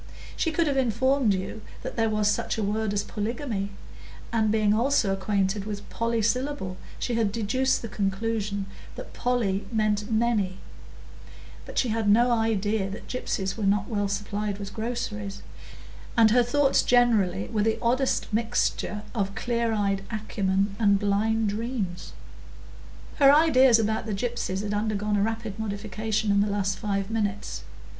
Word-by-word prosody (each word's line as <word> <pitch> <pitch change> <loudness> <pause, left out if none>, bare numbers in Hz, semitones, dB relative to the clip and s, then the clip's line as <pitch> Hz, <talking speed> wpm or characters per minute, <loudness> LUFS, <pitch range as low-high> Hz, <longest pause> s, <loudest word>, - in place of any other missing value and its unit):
She 330 - 0
could 335 +1 +1
have 280 -3 0
informed 260 0 +2
you 190 +3 -5 0.2
that - - -5
there 225 -1 +2
was 215 -1 +1
such 210 - 0
a 220 - -1
word 210 +1 0
as 205 0 0
"polygamy," 215 -1 -3 0.6
and 220 -2 +2
being 215 -1 +3
also 230 -3 +2
acquainted 195 0 0
with 205 -1 -6
"polysyllable," 230 -2 -1 0.2
she 245 - -2
had 225 -3 +1
deduced 250 +5 0
the - - -3
conclusion 205 0 -2 0.3
that - - -9
"poly" 230 -6 0
mean 215 -2 +2
"many"; 220 -5 +1 1.1
but - - -9
she 250 - +2
had 220 0 0
had - - +3
no 240 +4 +5
idea 220 -3 +1
that 200 - -8
gypsies 195 -6 -2
were 220 - -4
not 200 0 +2
well 205 -3 0
supplied 205 0 -2
with 200 -1 -7
groceries, 210 -3 -4 0.7
and 225 -2 +6
her 245 +2 +5
thoughts 270 +3 +3
generally 220 - +3
were 215 - 0
the 220 +1 +1
oddest 255 +3 +1
mixture 220 -2 0
of 200 -4 -2
clear 235 -1 0
eyed 200 -2 0
acumen 200 -2 -1
and 200 -3 +4
blind 215 +2 +1
dreams. 210 -4 -4 1.0
Her 275 -2 +7
ideas 265 -6 +6
about 220 0 -1
the 210 - -1
gypsies 205 -3 -2
had 210 0 -2
undergone 210 0 0
a 200 - +2
rapid 220 -1 -2
modification 215 0 -2
in 200 0 +4
the 205 - +1
last 200 -1 -1
five 200 -1 -2
minutes. 205 -3 -2
215 Hz, 155 wpm, -26 LUFS, 200-230 Hz, 1.1 s, Her